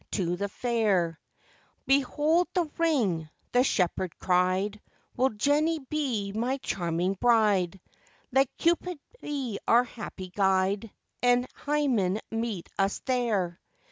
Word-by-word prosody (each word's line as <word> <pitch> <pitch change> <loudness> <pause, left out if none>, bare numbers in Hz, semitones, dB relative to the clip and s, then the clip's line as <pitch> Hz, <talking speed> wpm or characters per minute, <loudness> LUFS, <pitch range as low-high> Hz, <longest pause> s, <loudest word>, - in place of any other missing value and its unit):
'Behold, 295 +5 +2
the 350 -3 +2
ring,' 215 - +1 0.2
the 245 +1 +4
shepherd 180 - 0
cried; 185 +3 +1 0.3
'Will 260 +2 +3
Jenny 290 +9 +1
be 265 -8 -2
my 240 +6 -1
charming 175 -5 -1
bride? 205 -6 +3 0.5
Let 265 0 +3
Cupid 345 +1 +1 0.2
be 270 -8 -3
our 235 +2 +6
happy 210 -6 -8
guide, 195 +2 +1 0.3
And 245 0 +4
Hymen 250 -10 0
meet 225 -5 -3
us 195 +1 +2
there. 220 -9 0
230 Hz, 100 wpm, -28 LUFS, 190-270 Hz, 0.5 s, our